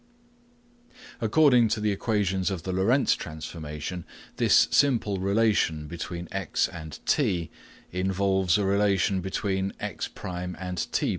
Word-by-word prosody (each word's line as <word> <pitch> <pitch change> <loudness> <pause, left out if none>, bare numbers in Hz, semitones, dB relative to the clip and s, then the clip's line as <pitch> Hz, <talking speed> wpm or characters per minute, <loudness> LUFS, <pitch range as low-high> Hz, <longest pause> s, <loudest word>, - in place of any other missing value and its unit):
According 125 +1 +5
to 110 - 0
the 105 0 +1
equations 100 -2 0
of 95 -5 -4
the 95 - -3
Lorentz 110 +9 +3
transformation, 80 +1 -6 0.3
this - - +5
simple 115 -8 +2
relation 100 -6 +1
between 85 +2 -6
x 95 -4 0
and 80 -3 -8
t 85 -3 +1 0.4
involves 95 0 +1
a 100 - 0
relation 100 -1 +2
between 95 +1 -2
x1 90 0 -5
and 90 -1 -5
t1. - - -1
95 Hz, 120 wpm, -27 LUFS, 85-105 Hz, 0.4 s, According